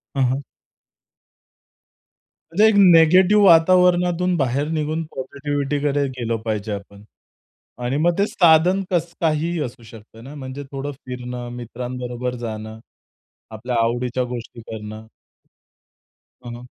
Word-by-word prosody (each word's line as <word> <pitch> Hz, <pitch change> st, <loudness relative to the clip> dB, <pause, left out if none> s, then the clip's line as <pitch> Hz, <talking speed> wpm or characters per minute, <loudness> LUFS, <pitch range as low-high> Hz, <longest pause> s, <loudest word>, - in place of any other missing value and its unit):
हं, 135 Hz, -, +2 dB
हं. 140 Hz, -, -4 dB, 2.1 s
म्हणजे 205 Hz, +6 st, +4 dB
एक 220 Hz, -, +3 dB
निगेटिव्ह 185 Hz, +3 st, +6 dB
वातावरणातून 180 Hz, +1 st, +4 dB
बाहेर 140 Hz, +1 st, 0 dB
निघून 155 Hz, +1 st, -2 dB
पॉझिटिव्हिटीकडे 145 Hz, +1 st, -2 dB
गेलो 120 Hz, -3 st, -3 dB
पाहिजे 105 Hz, -1 st, -3 dB
आपण. 100 Hz, 0 st, -9 dB, 0.8 s
आणि 125 Hz, +3 st, -1 dB
मग 170 Hz, +3 st, +1 dB
ते 200 Hz, -, +3 dB
साधन 175 Hz, +3 st, +4 dB
कसं 170 Hz, -1 st, -1 dB
काहीही 165 Hz, +1 st, 0 dB
असू 120 Hz, -1 st, -8 dB
शकतं 110 Hz, 0 st, -14 dB
ना. 140 Hz, +4 st, -10 dB
म्हणजे 135 Hz, 0 st, -7 dB
थोडं 140 Hz, +1 st, -4 dB
फिरणं, 125 Hz, -2 st, -7 dB
मित्रांबरोबर 125 Hz, +1 st, -5 dB
जाणं, 110 Hz, 0 st, -7 dB, 0.8 s
आपल्या 120 Hz, +3 st, -4 dB
आवडीच्या 120 Hz, +2 st, -1 dB
गोष्टी 120 Hz, -1 st, -7 dB
करणं. 110 Hz, 0 st, -9 dB, 1.4 s
हं, 120 Hz, -, -7 dB
हं. 120 Hz, +1 st, -11 dB
135 Hz, 115 wpm, -21 LUFS, 120-165 Hz, 2.1 s, निगेटिव्ह